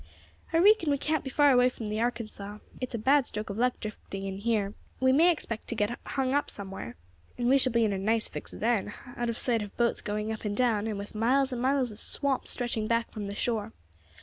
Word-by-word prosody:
I 325 - +2
reekon 390 -2 +5
we 285 - +3
can't 310 +1 -1
be 265 - -4
far 290 +1 +5
away 250 -1 +5
from 235 -3 -8
the 210 +1 -2
Arkansas. 215 -4 -3 0.2
It's 255 -2 -4
a - - 0
bad 265 +4 +3
stroke 210 0 -5
of 200 - -5
luck 250 +1 +1
drifting 200 -2 -6
in 195 0 -4
here; 210 -2 0 0.3
we 260 0 +4
may 320 +6 +6
expect 230 -9 -5
to 235 - -2
get 210 +2 -1
hung 265 -1 -1
up 290 +1 +1
somewhere, 195 - -7 0.4
and 240 - 0
we 270 +2 +5
shall 255 -1 +2
be 230 -1 +3
in 205 - +1
a 195 - -2
nice 220 +3 +2
fix - - -7
then, 220 -2 0 0.2
out 240 -1 -1
of 230 - -2
sight 235 -3 +1
of 205 -1 -8
boats 235 -1 +1
going 210 +1 -2
up 220 - -5
and 205 -1 -2
down, 225 -4 +2
and 215 -2 -2
with 200 +1 -7
miles 260 +5 +2
and 240 - -3
miles 260 -2 +2
of 210 - -10
swamp 275 -2 +1
stretching 230 -3 -1
back 230 0 0
from 210 -2 -5
the 200 - -5
shore. 220 -1 -1
230 Hz, 240 wpm, -29 LUFS, 210-260 Hz, 0.4 s, may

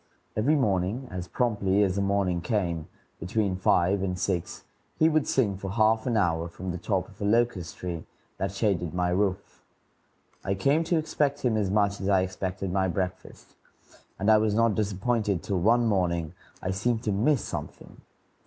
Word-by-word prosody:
Every 130 +9 +3
morning, 105 0 0
as 90 -1 -5
promptly 105 -4 +1
as 95 -2 +1
the 100 - 0
morning 100 -3 +1
came, 85 -7 -1 0.3
between 95 +2 -1
five 95 +1 +2
and 90 -1 -2
six, 90 -2 -2 0.3
he 160 - +5
would 155 -2 +2
sing 105 -8 +1
for 95 0 -5
half 110 +1 +2
an 120 -3 +1
hour 85 -4 +1
from 90 +2 -6
the 90 - -5
top 95 -1 -1
of 105 -2 -17
a - - -1
locust 105 -5 +1
tree 85 -3 -5 0.3
that 95 - -1
shaded 95 -5 -1
my 90 -1 +1
roof. 95 +1 -1 0.8
I 100 - -1
came 140 +11 +2
to 170 +1 +1
expect 150 -2 0
him 120 -3 +1
as 105 -3 0
much 100 0 +1
as 95 - -1
I 95 -2 +4
expected 95 0 -3
my 95 0 +1
breakfast, 90 +1 -5 0.6
and 100 +3 +3
I 110 - +6
was 105 -1 +1
not 115 -1 +3
disappointed 105 -2 0
till 100 -3 -1
one 115 +6 +3
morning 85 -6 0 0.3
I 95 - -1
seemed 110 +4 -1
to 105 - 0
miss 115 +6 +2
something. - - -7
100 Hz, 180 wpm, -27 LUFS, 90-110 Hz, 0.8 s, I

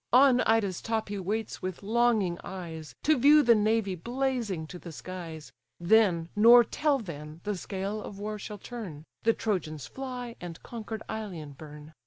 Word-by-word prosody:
On 255 0 +6
Ida's 210 -5 +2
top 225 -2 -2
he 205 -1 -3
waits 210 +4 -3
with 185 +1 -5
longing 215 -5 +2
eyes, 165 -5 -7
To 310 +1 +4
view 295 +4 +7
the 235 - +7
navy 215 -2 +2
blazing 235 -3 -2
to 180 +3 -9
the 170 - -9
skies; 160 +2 -8 0.3
Then, 175 -3 +3
nor 235 +3 +8
till 295 +4 +1
then, 155 - -8
the 210 0 -1
scale 195 +3 -4
of 200 - -8
war 210 +1 -4
shall 210 +1 -7
turn, 195 -9 -8 0.2
The 230 - +3
Trojans 155 - -2
fly, 250 -3 -6
and 170 -2 -6
conquer'd 220 -2 -6
Ilion 190 -9 -5
burn. 150 +2 -11
205 Hz, 165 wpm, -29 LUFS, 170-230 Hz, 0.3 s, nor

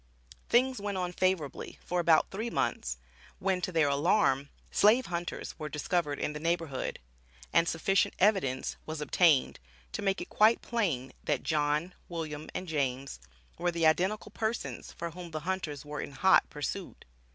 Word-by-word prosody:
Things 255 -1 +3
went 200 -1 -2
on 180 -1 -2
favorably 185 -6 -1
for 180 - 0
about 165 -2 +4
three 220 +5 -3
months, 65 - -1 0.4
when 190 -1 0
to 185 - -2
their 160 -4 +3
alarm 140 -2 +2 0.2
"slave 225 +5 +5
hunters 175 0 -4
were 150 - -4
discovered 150 -1 -1
in 150 - -1
the 150 - -5
neighborhood," 165 -4 -1 0.6
and 165 - +4
sufficient 195 +4 +1
evidence 185 -11 +2
was 155 0 -4
obtained 150 -1 +3 0.3
to - - -4
make 195 -1 +1
it 175 - -5
quite 220 +2 +4
plain 160 - -1
that, - - 0
John, 150 +3 0 0.2
William 155 -3 -5
and 185 - -3
James 135 - -2 0.4
were 175 - +1
the 170 -1 0
identical 190 +7 +2
persons, 220 +2 -3
for 170 0 -5
whom 175 +1 -8
the 155 -1 -5
hunters 155 -5 -3
were 150 0 -4
in 145 - -7
"hot 190 +8 +4
pursuit." 170 +5 -5
170 Hz, 160 wpm, -30 LUFS, 150-190 Hz, 0.6 s, slave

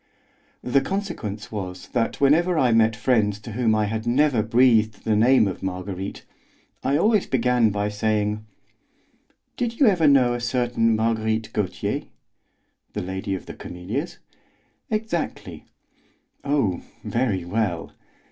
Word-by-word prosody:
The 130 +2 +2
consequence 135 - -4
was 95 -4 -6
that 115 -2 -1
whenever 165 +5 +3
I 130 -5 +3
met 115 -1 +4
friends 110 -4 +1
to 115 - -8
whom 110 0 +1
I 105 -1 +1
had 110 +2 -3
never 130 -1 +3
breathed 115 -1 +3
the 110 -1 +2
name 115 +1 +5
of 95 - -5
Marguerite, 95 +1 -5 0.6
I 140 +2 +2
always 210 +3 +2
began 125 -2 +2
by 105 0 -1
saying: 105 0 -1 1.1
"Did 235 -1 -2
you 280 - +6
ever 180 -8 +4
know 130 -4 +5
a 120 - -2
certain 120 -2 +1
Marguerite 110 0 -1
Gautier?" 100 -4 -2 0.9
"The - - -3
Lady 95 +2 -3
of 95 - -8
the - - -8
Camellias?" 100 - -5 0.7
"Exactly." 215 -7 -3 0.8
"Oh, 140 -11 0 0.2
very 110 -8 -1
well!" 90 -3 -2
115 Hz, 130 wpm, -23 LUFS, 105-135 Hz, 1.1 s, you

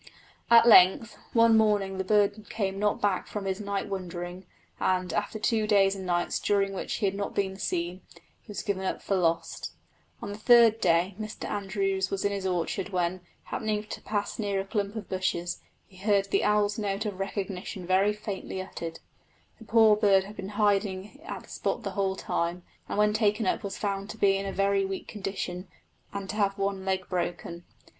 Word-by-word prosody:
At 230 0 +8
length, 210 +1 +6 0.2
one 230 -1 +5
morning 205 -3 +2
the - - +1
bird 205 +1 +1
came 195 -2 -2
not 210 0 +1
back 200 -3 0
from 205 -2 -5
his 190 +1 -2
night 200 -1 -2
wandering, 180 -1 -6 0.3
and 185 -2 0
after 170 +6 -1
two 215 0 +1
days 200 -2 +4
and 190 -1 -6
nights, 175 -1 0
during 200 -1 +1
which 190 - -3
he 215 - -1
had 195 - +1
not 200 0 -4
been 190 -1 0
seen, 175 0 -2 0.4
he - - -34
was 210 - -5
given 200 -3 -2
up 190 - -3
for - - -1
lost. 165 -2 -1 0.5
On - - -6
the 205 - -7
third 230 -1 +6
day 175 +2 +3
Mr 215 0 -5
Andrews 195 -1 -1
was 195 0 -2
in 200 - +2
his 195 -1 -2
orchard, 180 +2 -1
when, 180 -1 -1 0.2
happening 215 -1 -2
to 215 - -8
pass 205 0 -3
near 200 -2 0
a 195 - -3
clump 205 0 -2
of 220 -3 -5
bushes, 185 -2 -2 0.2
he 185 - -19
heard 200 0 +1
the - - +2
owl's 210 0 +2
note 205 0 -2
of 200 -3 -4
recognition 195 -1 -4
very 190 +3 +3
faintly 210 -2 -5
uttered. 170 -3 -6 0.6
The 225 - -12
poor 220 -1 +6
bird 200 -2 +4
had 205 +2 -10
been 190 - -6
in - - -6
hiding 205 +3 0
at 375 - -6
that - - -15
spot - - -2
the - - -3
whole 195 -2 0
time, 175 -1 -2 0.3
and - - -3
when 210 0 +4
taken 215 0 +1
up - - +1
was 200 -2 -5
found 200 -1 -3
to - - -7
be 195 -2 +4
in 195 0 -2
a - - -2
very 195 0 +2
weak 195 0 -4
condition 190 -3 -5 0.4
and 200 -1 -5
to 210 - -6
have 200 -1 +1
one 195 -1 -2
leg 190 -1 -1
broken. 175 -1 -3
195 Hz, 200 wpm, -28 LUFS, 190-210 Hz, 0.6 s, At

